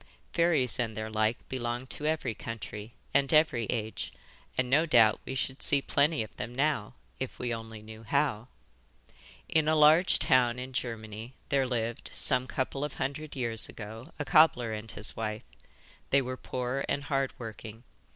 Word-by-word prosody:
Fairies 160 -9 +3
and 110 -3 -1
their 110 0 -4
like 110 +1 0
belong 120 -1 -3
to 150 +3 -5
every 155 -7 0
country 110 0 -7 0.2
and 140 -1 +3
every 155 -7 +4
age, 110 -2 -3 0.5
and 130 - +2
no 150 +6 +3
doubt 115 -7 +5
we 130 - -4
should 130 +1 -3
see 145 - +3
plenty 145 0 +2
of 110 - -12
them 120 - -5
now 135 -5 0 0.2
if 130 - -4
we 120 -1 -2
only 115 -1 -7
knew 110 0 -10
how. 120 -1 0 1.0
In 155 -1 +2
a 155 - +4
large 155 +4 +6
town 125 -2 +4
in 130 +1 -6
Germany 115 -1 -5
there 135 -2 +2
lived, 120 -2 -2
some 125 +1 +4
couple 135 +2 -2
of 150 - -4
hundred 140 +3 -4
years 115 -4 -1
ago, 110 +7 -9
a 145 - -3
cobbler 155 -9 +5
and 110 +1 -6
his 105 0 -3
wife. 110 -1 -3 0.7
They 140 0 +4
were 130 +1 -4
poor 130 +1 -3
and 140 - 0
hard 135 -2 0
working. 110 0 -8
125 Hz, 170 wpm, -30 LUFS, 110-140 Hz, 1.0 s, large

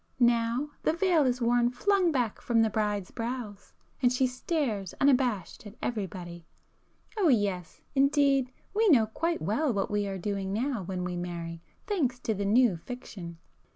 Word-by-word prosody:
Now 240 +3 +2
the - - +2
veil 335 -4 +3
is 250 0 0
worn 240 0 +3
flung 360 +8 +2
back 245 -7 -1
from 230 -2 +3
the 220 - +1
bride's 210 -3 -1
brows, 230 -4 -5 0.3
and 245 -2 +4
she 255 +1 +2
stares 250 - -2
unabashed 250 -8 +1
at 205 - -12
everybody,—oh 190 - -5
yes, 200 - 0
indeed 275 -2 +3 0.2
we 435 +1 +3
know 245 -9 +6
quite 330 +10 -2
well 270 +8 +1
what 200 -3 -1
we 205 -1 0
are 195 -1 -3
doing 195 0 -3
now 240 +2 -1
when 185 0 -4
we 180 0 -3
marry, 170 -1 -5 0.2
thanks 290 - 0
to 220 - 0
the 200 0 -3
'new' 220 -2 +4
fiction!" 180 -5 -8
235 Hz, 155 wpm, -29 LUFS, 200-270 Hz, 0.3 s, know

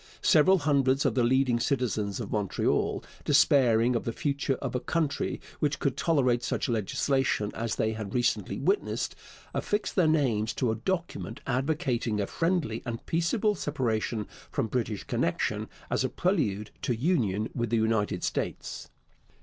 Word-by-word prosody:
Several 185 +5 +6
hundreds 140 -3 +2
of - - +3
the 125 - +2
leading 125 0 +3
citizens 110 -6 -1
of - - -5
Montreal, 105 -3 0 0.2
despairing 125 -5 +4
of 115 - 0
the 115 - -2
future 140 +1 -1
of 130 -1 -5
a 125 - 0
country 155 +1 -1 0.2
which 150 -1 +1
could 135 -3 0
tolerate 135 -6 +2
such - - -1
legislation 115 0 0
as 115 -1 -2
they 110 - +1
had 110 -1 -6
recently 120 0 0
witnessed, 405 - 0 0.4
affixed 210 +1 -1
their 180 -4 +4
names 125 -9 +2
to 125 -4 0
a - - -1
document 170 - -3
advocating 130 -4 0
a 100 - +1
friendly 165 - -1
and 115 -1 -5
peaceable 190 +6 +1
separation 120 - -1 0.2
from - - -1
British 110 -3 -2
connection - - -1 0.2
as - - +1
a - - 0
prelude 110 - 0
to 125 - 0
union 110 - +1
with 120 -2 -1
the 115 - +2
United 110 -5 +1
States. - - -3
125 Hz, 150 wpm, -28 LUFS, 110-150 Hz, 0.4 s, Several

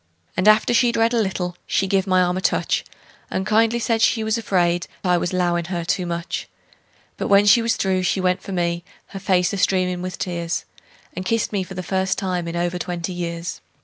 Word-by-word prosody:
And 185 +3 +1
after 215 +2 +5
she'd 240 0 +3
read 225 +1 +3
a 235 - +3
little 180 -3 -2
she 195 - +1
give 195 0 +1
my 185 -1 +4
arm 180 0 0
a 185 - -2
touch, - - +1 0.5
And 190 - -2
kindly 225 +2 +3
said 230 -1 0
she 225 0 +3
was 220 0 +1
afraid 175 -6 +1 0.2
I 180 -2 +3
was 175 - -1
'lowin' 175 -2 0
her 175 -1 -3
too 180 +1 -1
much; 170 0 -4 0.7
But - - -2
when 200 0 +5
she 205 +3 +6
was 230 0 +1
through 190 -1 0
she 180 +1 0
went 185 0 +1
for - - -8
me, 170 -2 -1 0.3
her 195 - -7
face 185 -1 +1
a - - -2
streamin' 185 -1 +1
with 185 0 -5
tears, 170 -2 -3 0.5
And 185 - -4
kissed 225 +2 0
me 200 - +1
for 190 +1 -7
the 185 - -4
first 190 0 0
time 180 -3 -2
in 170 - -4
over 175 +1 -1
twenty 175 0 -4
years! 170 0 -4
185 Hz, 215 wpm, -22 LUFS, 175-200 Hz, 0.7 s, she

